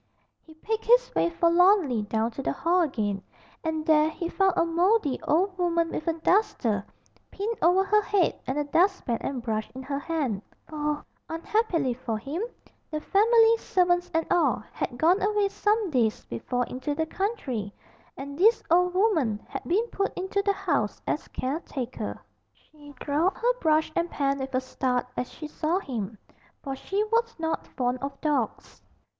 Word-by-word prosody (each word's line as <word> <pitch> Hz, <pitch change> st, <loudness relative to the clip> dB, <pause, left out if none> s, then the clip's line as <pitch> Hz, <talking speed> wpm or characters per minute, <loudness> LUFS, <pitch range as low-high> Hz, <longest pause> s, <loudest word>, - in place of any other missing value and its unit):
He 315 Hz, -, -17 dB
picked 440 Hz, +7 st, -3 dB
his -, -, +4 dB
way -, -, +2 dB
forlornly 340 Hz, -, +4 dB
down 220 Hz, +2 st, -1 dB
to 250 Hz, -, -6 dB
the -, -, -1 dB
hall 350 Hz, +2 st, +2 dB
again, 210 Hz, -, -1 dB, 0.4 s
and 315 Hz, -1 st, -2 dB
there 310 Hz, -1 st, +4 dB
he 335 Hz, +2 st, -4 dB
found 385 Hz, 0 st, +2 dB
a -, -, +4 dB
mouldy 340 Hz, -, +2 dB
old 370 Hz, +5 st, +1 dB
woman 335 Hz, -1 st, +1 dB
with 315 Hz, -, -4 dB
a 330 Hz, -, +3 dB
duster 325 Hz, -, +1 dB, 0.5 s
pinned 435 Hz, +4 st, -3 dB
over 360 Hz, +3 st, +5 dB
her 425 Hz, +2 st, +3 dB
head 405 Hz, -3 st, +1 dB
and 265 Hz, -, -1 dB
a 295 Hz, -, +1 dB
dustpan 330 Hz, -, +1 dB
and 260 Hz, -3 st, -3 dB
brush 220 Hz, -2 st, -2 dB
in 260 Hz, -, -6 dB
her 275 Hz, +1 st, -3 dB
hand; 285 Hz, -, -2 dB, 0.3 s
for, 300 Hz, -1 st, -3 dB, 0.2 s
unhappily 330 Hz, -, 0 dB
for 235 Hz, -2 st, -3 dB
him, 275 Hz, -, -4 dB, 0.5 s
the 305 Hz, -, -3 dB
family, 450 Hz, +6 st, +4 dB
servants 355 Hz, -4 st, +1 dB
and 325 Hz, 0 st, +1 dB
all, 300 Hz, -11 st, +2 dB
had 245 Hz, -, -4 dB
gone 350 Hz, +8 st, +3 dB
away 415 Hz, 0 st, +2 dB
some 420 Hz, -1 st, +1 dB
days 230 Hz, -5 st, +1 dB
before 245 Hz, -, -2 dB
into 265 Hz, +5 st, -4 dB
the 320 Hz, +1 st, 0 dB
country, 290 Hz, -, -3 dB, 0.5 s
and 280 Hz, +2 st, -7 dB
this 445 Hz, +5 st, +5 dB
old 360 Hz, +1 st, +4 dB
woman 320 Hz, -, +2 dB
had -, -, -5 dB
been 405 Hz, +7 st, +2 dB
put 395 Hz, 0 st, -1 dB
into 380 Hz, +2 st, -1 dB
the 400 Hz, 0 st, +1 dB
house 330 Hz, -, -1 dB
as 300 Hz, -, -2 dB
caretaker. 255 Hz, -5 st, -4 dB, 0.3 s
She 295 Hz, -1 st, -17 dB
dropped 310 Hz, +6 st, +1 dB
her -, -, +2 dB
brush 315 Hz, -1 st, +2 dB
and 340 Hz, 0 st, 0 dB
pan 275 Hz, -3 st, 0 dB
with 265 Hz, 0 st, -4 dB
a 255 Hz, -, +2 dB
start 255 Hz, -1 st, -1 dB
as 250 Hz, -, -3 dB
she 315 Hz, -, -8 dB
saw 310 Hz, +3 st, -1 dB
him, 225 Hz, -, -4 dB, 0.5 s
for 270 Hz, -2 st, -4 dB
she 390 Hz, +9 st, -1 dB
was 460 Hz, +2 st, 0 dB
not 325 Hz, -1 st, -2 dB
fond 250 Hz, 0 st, -2 dB
of 275 Hz, +1 st, -5 dB
dogs. 290 Hz, -7 st, -2 dB
320 Hz, 170 wpm, -27 LUFS, 265-380 Hz, 0.5 s, over